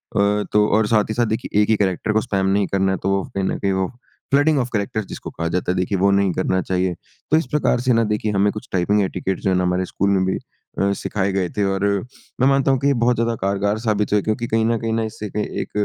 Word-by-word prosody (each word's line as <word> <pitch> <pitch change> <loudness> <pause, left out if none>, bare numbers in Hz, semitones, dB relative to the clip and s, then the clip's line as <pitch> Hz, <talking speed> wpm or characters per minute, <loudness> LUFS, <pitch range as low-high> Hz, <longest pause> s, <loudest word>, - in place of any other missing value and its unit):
अ, 100 - +2 0.3
तो 105 0 +4
और 110 -1 +2
साथ 105 -2 +3
ही - - -1
साथ 120 +1 +1
देखिए, 110 -1 0
एक 105 - +1
ही 110 - +5
कैरेक्टर 100 +1 0
को 110 - +3
स्पैम 100 -5 -1
नहीं 100 0 +2
करना 95 0 +1
है। 95 - 0
तो 95 - +1
वो 95 -1 +1
कहीं 95 - 0
न - - -1
कहीं 100 - 0
वो 95 -1 0 0.4
फ्लडिंग 145 +2 +4
ऑफ 125 0 -1
कैरेक्टर्स 105 0 -2
जिसको - - -7
कहा 85 +1 -3
जाता 90 +1 -1
है, - - -1
देखिए 90 +2 0
वो 100 +2 +3
नहीं 100 -1 +2
करना 95 0 0
चाहिए। 90 -1 -1 0.4
तो 155 - +6
इस 160 - 0
प्रकार 150 -4 +2
से 125 -1 +2
ना 115 - +3
देखिए 105 0 -1
हमें 100 +1 +2
कुछ 110 +4 -8
टाइपिंग 100 +3 +2
एटिकेट्स 95 0 -3
जो 95 - +1
है 95 - +2
ना 90 - +1
हमारे 90 +1 0
स्कूल 100 +2 -1
में 95 -1 +2
भी 95 - 0 0.4
अ, 100 0 +2
सिखाए 100 -1 -2
गए 95 -3 0
थे, 105 - +2
और 95 0 -1 0.6
मैं 130 - +5
मानता 135 0 +3
हूँ 135 - +2
कि 140 - +1
ये 140 - +4
बहुत 125 +1 +3
ज़्यादा 115 0 0
कारगर 100 +2 0
साबित 105 -3 0
हुए 105 - +5
हैं - - -5
क्योंकि 115 +2 -1
कहीं 110 0 +1
न 115 0 +1
कहीं 115 0 -2
न 115 - 0
इससे 105 -1 -6
क - - -2
एक 105 - -3
105 Hz, 280 wpm, -21 LUFS, 95-115 Hz, 0.6 s, तो